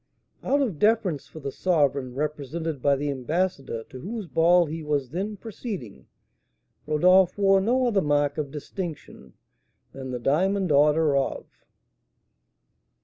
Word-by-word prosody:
Out 280 +2 +1
of 200 - -3
deference 210 -8 +1
for 155 - -11
the 140 0 -4
sovereign 140 -7 0
represented 150 +1 -3
by 140 +1 +3
the 145 +1 -2
ambassador 135 -3 -2
to 130 - -9
whose 215 - -5
ball 175 +1 +4
he 160 +1 -5
was 145 -4 -1
then 200 +5 -3
proceeding, 190 - -8 0.8
Rodolph 180 +5 +4
wore 195 -1 +4
no 250 +5 +2
other 210 -5 +2
mark 145 -1 +1
of 145 -2 -3
distinction 150 - -7 0.6
than 135 -1 -7
the 125 - -3
diamond 180 - +1
order 150 +1 +4
of 135 -1 -1
155 Hz, 135 wpm, -25 LUFS, 140-190 Hz, 0.8 s, ball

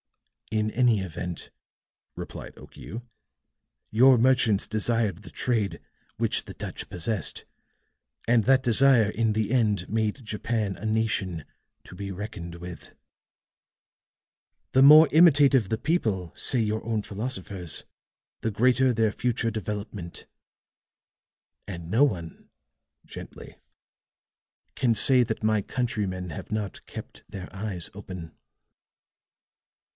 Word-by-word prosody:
"In 110 0 0
any 120 -3 +3
event," 90 -1 -6 0.6
replied - - -8
Okiu, 110 +10 -10 0.9
"your 125 +3 +6
merchants 120 -4 +3
desired 110 -3 0
the - - -11
trade 110 -6 -1 0.4
which - - 0
the - - -10
Dutch - - -7
possessed, 90 +1 -2 0.8
and 115 -1 +4
that 130 +1 +4
desire, 120 -2 +5
in 115 0 0
the 110 0 -1
end, 105 -7 +1
made 110 +3 -2
Japan 105 -2 -2
a - - -9
nation 110 -7 -1 0.4
to - - -12
be 100 +1 -6
reckoned 90 -3 -7
with. 85 0 -10 1.8
The 130 - +5
more 150 +3 +9
imitative 145 - +5
the 110 - 0
people, 110 - -1
say 130 - +1
your 110 -1 -1
own 110 -2 -2
philosophers, 100 -6 -4 0.6
the 115 - -1
greater 125 +4 +3
their 110 -2 +1
future 115 0 -1
development. 105 -4 -6 1.4
And 85 -4 -7
no 115 +9 +4
one," 85 - -2 0.6
gently, - - -10 1.2
"can 120 -3 +2
say 125 +4 +5
that 110 -2 -4
my 110 -1 +2
countrymen 100 -7 -3
have 75 - -8
not 105 -2 -4
kept - - -10
their 95 -1 -9
eyes 95 -4 -5
open." 90 -5 -9
110 Hz, 115 wpm, -26 LUFS, 95-120 Hz, 1.8 s, more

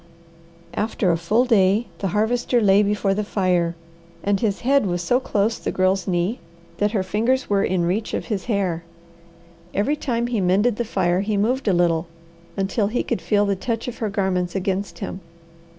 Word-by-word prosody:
After 210 -3 0
a - - +2
full 210 +9 +2
day 210 -1 +3
the 195 - -1
Harvester 235 +5 +1
lay 200 -2 +5
before 205 -1 +1
the 210 +2 -1
fire, 180 -4 0 0.5
and 200 -1 +1
his 205 -2 -1
head 275 -3 +3
was 175 -1 -1
so 245 +8 +2
close 220 -3 0
the - - -3
Girl's 190 +1 +1
knee 185 +6 0 0.4
that 205 +1 +1
her 195 -4 +1
fingers 230 +7 0
were 200 -1 +3
in 180 -1 +1
reach 200 +6 -1
of - - -3
his 205 -5 -3
hair. 190 -7 -1 0.9
Every 220 +10 +1
time 240 -5 -1
he 240 -4 -1
mended 205 +5 +2
the 240 - -1
fire 180 -4 +1
he 205 +1 -1
moved 245 +5 0
a - - +5
little, 170 -1 +2 0.5
until 200 +2 0
he 235 +4 -1
could 235 - -2
feel 205 -1 +2
the 200 -1 +1
touch 230 +4 -3
of 245 - -6
her 220 - -1
garments 190 -3 -1
against 195 0 -2
him. 190 - -6
200 Hz, 185 wpm, -22 LUFS, 185-225 Hz, 0.9 s, lay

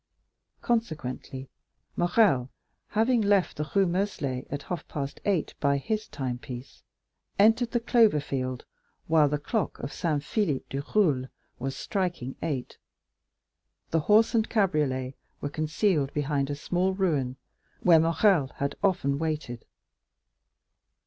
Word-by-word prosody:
Consequently, 150 - -2 0.5
Morrel, 175 - +3 0.4
having 225 +2 +2
left 200 -3 +2
the 150 0 -3
Rue 195 -1 +5
Meslay 170 -8 -2
at 145 0 -4
half 175 -4 -5
past 140 -2 -5
eight 190 -6 0
by 140 -1 +2
his 215 +10 -2
timepiece, 125 -1 -6 0.6
entered 225 +4 +4
the 240 - 0
clover 230 -8 +4
field 130 -3 -3 0.4
while 155 -3 +4
the 150 - 0
clock 190 +7 -2
of 140 - -6
Saint 150 -4 -1
Philippe 150 - -1
du 135 - -2
Roule 145 -11 +3 0.3
was 135 +2 -3
striking 175 - -2
eight. 140 -6 -4 1.1
The 165 - +3
horse 215 +8 +4
and 225 -1 +2
cabriolet 150 - +1 0.3
were 145 - -3
concealed 155 0 0
behind 145 -1 0
a 145 - -2
small 180 +5 0
ruin, 150 -10 0 0.5
where 170 -3 +6
Morrel 165 -1 +3
had 140 0 -2
often 145 -8 +1
waited. 155 -7 -3
155 Hz, 125 wpm, -27 LUFS, 135-195 Hz, 1.1 s, where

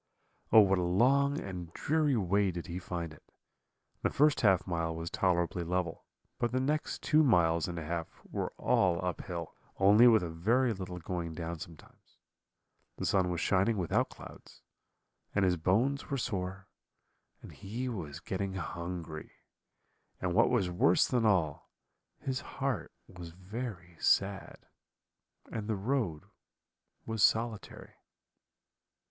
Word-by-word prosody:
"Oh, 110 - +9
what 95 -2 +3
a - - 0
long 135 +11 +3
and 90 -3 -6
dreary 150 -2 +1
way 100 0 +2
did 85 -2 -5
he 90 +1 -5
find 85 -3 -5
it! 80 - -17 0.8
The - - +1
first 150 0 +3
half 95 -5 +4
mile 85 -2 -2
was 80 0 -5
tolerably 85 -1 +1
level, 90 -1 -2 0.3
but 120 - 0
the 130 - +1
next 150 +4 -1
two 155 0 +4
miles 85 - +3
and 85 -1 -5
a 80 - -5
half 85 0 -3 0.2
were - - -3
all 90 -3 +2
uphill, 85 -2 -4 0.2
only 105 +5 +7
with 110 -5 +5
a 85 - -3
very 115 +9 +2
little 90 -2 -6
going 85 -1 -4
down 85 0 -5
sometimes. 80 -2 -13 0.8
The - - -3
sun 95 -2 +2
was 85 -1 -2
shining 100 +3 +2
without 90 -4 +1
clouds, - - -13 0.7
and 100 -1 +3
his 90 -1 +3
bones 110 - +1
were 140 - -1
sore, 95 -4 -3 0.8
and - - -10
he 110 +6 -5
was 80 - -5
getting 95 +3 -3
hungry; 85 -3 -5 0.9
and 90 -1 -1
what 115 +5 +4
was 100 -8 +1
worse 90 0 +4
than 120 -3 +2
all, 85 -8 +1 0.5
his 130 0 -3
heart 135 -5 -3 0.2
was 90 -2 -10
very 90 -1 -7
sad, 95 -1 +1 0.9
and 110 -2 -4
the 110 - 0
road 100 - -1 0.8
was 110 -1 -3
solitary. 110 0 0
95 Hz, 140 wpm, -31 LUFS, 85-115 Hz, 0.9 s, Oh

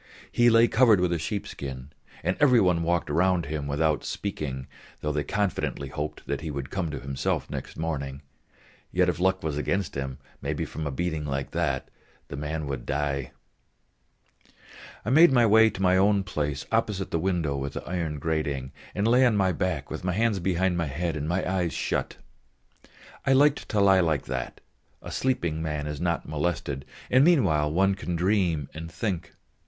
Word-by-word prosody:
He 120 0 +5
lay 115 0 +6
covered 115 -5 +5
with 90 -1 +1
a 85 - -1
sheepskin, 70 -7 -5 0.3
and 90 - +1
every 130 -5 +6
one 90 -4 +3
walked 85 +1 0
round 90 +2 +2
him, 75 -1 -3
without 75 +1 +1
speaking; 70 -10 -4 0.4
though 75 - -1
they 75 -1 -1
confidently 95 -9 -2
hoped 75 +2 -5
that - - -3
he 80 - -4
would 70 -2 -5
come 95 -4 -2
to 75 - -4
himself 65 0 -2
next - - -6
morning, 70 -3 -3 0.7
yet 90 0 +3
if 85 - -2
luck 95 +1 +1
was 75 -2 -2
against 90 0 -1
him, 65 -1 -4 0.2
maybe - - -2
from 80 -1 -5
a - - -2
beating 80 +1 -2
like 70 -1 -3
that, - - -1 0.4
the - - -5
man 75 +2 -3
would 70 -4 -5
die. 70 -2 -1 1.7
I 110 - 0
made 160 +3 +7
my 120 -3 +5
way 110 +1 +6
to 95 -2 -5
my 90 0 +4
own 100 +1 +3
place 75 -6 -3
opposite 105 -4 0
the 85 - +1
window 85 -5 0
with 70 0 -3
the - - -6
iron 85 -4 -2
grating, 70 -4 -2 0.2
and 100 +3 +1
lay 125 +3 +5
on 120 -5 +4
my 95 -2 +3
back 85 -5 -2
with 80 - -5
my 90 0 0
hands 110 0 +1
behind 90 0 +1
my 85 -2 0
head 80 +4 -2
and 75 +1 -3
my 90 +2 0
eyes 90 -3 0
shut. - - -2 1.1
I 135 - +5
liked 145 +2 +3
to 105 - +1
lie 95 -1 +6
like 80 -5 +1
that; 65 -2 -4 0.4
a - - -7
sleeping 85 -12 0
man 75 -2 -2
is 75 0 -5
not 85 -1 -1
molested, 75 -3 -2 0.3
and 130 +2 +6
meanwhile 80 - +3
one 95 +4 +3
can 90 -2 -4
dream 90 -5 +1
and 80 +1 -7
think. 85 -1 -3
85 Hz, 185 wpm, -27 LUFS, 75-95 Hz, 1.7 s, made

